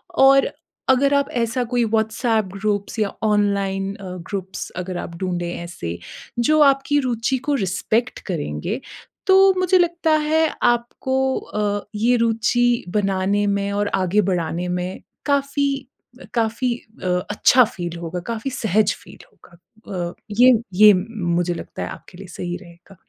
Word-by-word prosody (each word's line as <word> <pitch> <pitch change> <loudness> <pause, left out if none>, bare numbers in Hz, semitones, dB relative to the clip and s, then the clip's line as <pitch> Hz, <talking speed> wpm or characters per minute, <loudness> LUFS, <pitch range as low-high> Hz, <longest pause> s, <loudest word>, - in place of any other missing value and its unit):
और 270 0 +6 0.4
अगर 275 +2 +4
आप 280 0 +1
ऐसा 230 +2 0
कोई 245 - +3
व्हाट्सएप 220 0 +1
ग्रुप्स 205 +2 -2
या 205 -2 0
ऑनलाइन 200 -2 +1
अ, 200 - -12 0.3
ग्रुप्स 190 -2 -5
अगर 180 0 -4
आप 170 - -6
ढूँढें 175 -2 -2
ऐसे, 85 - -6 0.4
जो 305 +6 +3
आपकी 275 +2 +1
रूचि 250 0 0
को - - +3
रिस्पेक्ट 220 +6 -1
करेंगे, 145 - -3 0.5
तो 385 0 +7
मुझे 370 0 +4
लगता 340 -2 +1 0.2
है, 320 +1 +3 0.2
आपको 260 +2 +1
अ, 205 -1 -2
ये 235 +4 +3
रूचि 235 +1 +2
बनाने 195 +1 +1
में 200 0 0
और 205 0 0
आगे 190 +2 +2
बढ़ाने 175 0 -2
में 180 +1 -3 0.3
काफ़ी 280 0 +1 0.5
अ, - - -10
काफ़ी 235 +2 0 0.3
अ, - - -2 0.2
अच्छा 250 +4 +5
फ़ील 175 -5 -6
होगा, 170 +1 -4
काफ़ी 230 +4 -3
सहज 215 -3 +1
फ़ील - - -14
होगा। 170 - -21 0.5
अ, - - -15 0.3
ये 255 +1 +8 0.2
ये 210 +2 +9
मुझे 180 -4 -1
लगता 170 - -6
है, - - -4
आपके 175 - -11
लिए 195 - -9
सही 175 0 -3
रहेगा। 175 +1 -16
210 Hz, 145 wpm, -21 LUFS, 185-250 Hz, 0.5 s, ये